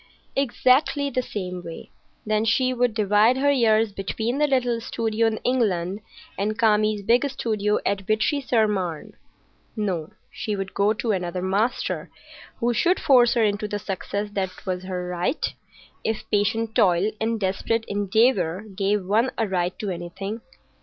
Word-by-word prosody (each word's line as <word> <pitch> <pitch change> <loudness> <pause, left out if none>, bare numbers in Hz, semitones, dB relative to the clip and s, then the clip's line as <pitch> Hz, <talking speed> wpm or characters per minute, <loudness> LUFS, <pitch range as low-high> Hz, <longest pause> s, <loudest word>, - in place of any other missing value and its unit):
Exactly 275 +2 +2
the 255 - 0
same 180 -6 -5
way. 165 -1 -9 0.3
Then 215 0 +1
she 255 +3 +2
would 245 -2 +1
divide 215 +3 +4
her 285 +2 +3
years 225 -4 +3
between 220 +6 -3
the 300 - +3
little 245 -4 +1
studio 225 -1 0
in 220 -1 -1
England 200 -7 0 0.4
and 215 +2 -1
Kami's 215 -2 +2
big 235 +6 +3
studio 210 -5 0
at 200 -1 0
Vitry 220 +7 +1
sur 230 -4 +2
Marne. 180 -6 -3 0.6
No, 185 -8 -2 0.2
she 210 - -3
would 195 -1 -5
go 200 +1 +2
to 225 +1 -2
another 180 -2 -2
master, 205 +6 -1 0.5
who 240 +1 +1
should 360 +9 +2
force 245 -3 +5
her 235 - +3
into 210 0 0
the 205 0 -3
success 205 +1 -4
that 195 -2 -1 0.2
was 185 -1 -3
her 180 -1 -4
right, 180 - -1 0.5
if 220 -1 -2
patient 220 +2 +1
toil 185 +2 +3
and 225 0 0
desperate 210 +4 -1
endeavour 205 -2 +1
gave 200 0 0
one 220 +6 +2
a 225 - +1
right 180 -2 -1
to 205 -3 -3
anything. 190 +5 -5
215 Hz, 155 wpm, -24 LUFS, 195-230 Hz, 0.6 s, force